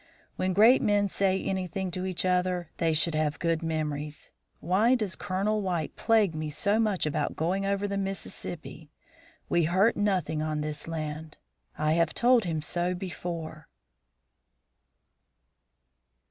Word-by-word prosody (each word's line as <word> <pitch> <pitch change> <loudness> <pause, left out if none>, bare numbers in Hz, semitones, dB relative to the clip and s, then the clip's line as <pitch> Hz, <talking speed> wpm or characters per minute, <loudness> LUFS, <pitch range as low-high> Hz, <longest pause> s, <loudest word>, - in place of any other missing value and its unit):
When 185 0 0
great 225 +7 +6
men 205 -1 +2
say 190 0 0
anything 190 0 -2
to 185 +2 -3
each 185 0 -2
other, 180 -2 0
they 165 -1 +2
should 160 +1 +2
have 155 -1 0
good 165 -1 0
memories. 150 -2 -3 0.3
Why 210 +9 +3
does 210 -6 -2
Colonel 205 +2 -1
White 175 -5 -2
plague 220 -6 +3
me 155 0 -3
so 200 +8 +1
much 210 -7 +1
about 150 - -1
going 190 +5 0
over 200 +1 0
the 200 0 -2
Mississippi? 175 -5 -6 0.6
We 170 -2 +2
hurt 190 +7 +3
nothing 185 -7 0
on 155 -1 -1
this 150 0 -4
land. 155 -1 -5 0.4
I 155 0 +1
have 165 0 +2
told 240 -3 +4
him 160 -3 -2
so 175 +2 -1
before." 170 -4 -6
180 Hz, 140 wpm, -28 LUFS, 155-195 Hz, 0.6 s, great